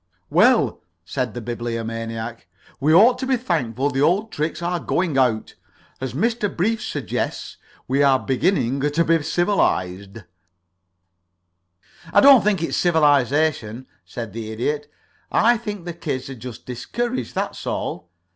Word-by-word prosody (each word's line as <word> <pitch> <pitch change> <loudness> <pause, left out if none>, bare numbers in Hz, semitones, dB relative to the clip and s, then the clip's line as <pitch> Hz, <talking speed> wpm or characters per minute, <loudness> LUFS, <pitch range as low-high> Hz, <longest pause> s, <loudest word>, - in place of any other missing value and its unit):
"Well," - - +4 0.2
said 125 -1 -3
the 120 - -4
Bibliomaniac, 115 -2 -5 0.3
"we 150 +3 +2
ought 230 +9 +6
to 260 - -3
be 260 -1 +2
thankful 145 - -1
the 135 0 -1
old 195 +9 +2
tricks 155 +2 -2
are 175 0 -1
going 170 -2 -1
out. 125 -5 +1 0.5
As 130 -2 -4
Mr. 225 - 0
Brief 220 +6 +1
suggests, - - -4 0.3
we 135 +2 +1
are 135 -2 +5
beginning 135 -1 0
to 150 +4 +1
be 165 0 +3
civilized 110 - -1 0.9
" 85 - -26
"I - - +8
don't 275 -4 +8
think 200 -5 +1
it's - - -1
civilization," 145 -6 +2 0.2
said 115 -4 -7
the 110 -1 -6
Idiot. 145 +6 -3 0.4
"I 235 +2 +4
think 205 -5 -6
the 175 - -4
kids 140 -6 -4
are - - -5
just 120 0 -9
discouraged, 235 - -4
that's - - -3
all. - - -4
140 Hz, 140 wpm, -22 LUFS, 115-175 Hz, 0.9 s, I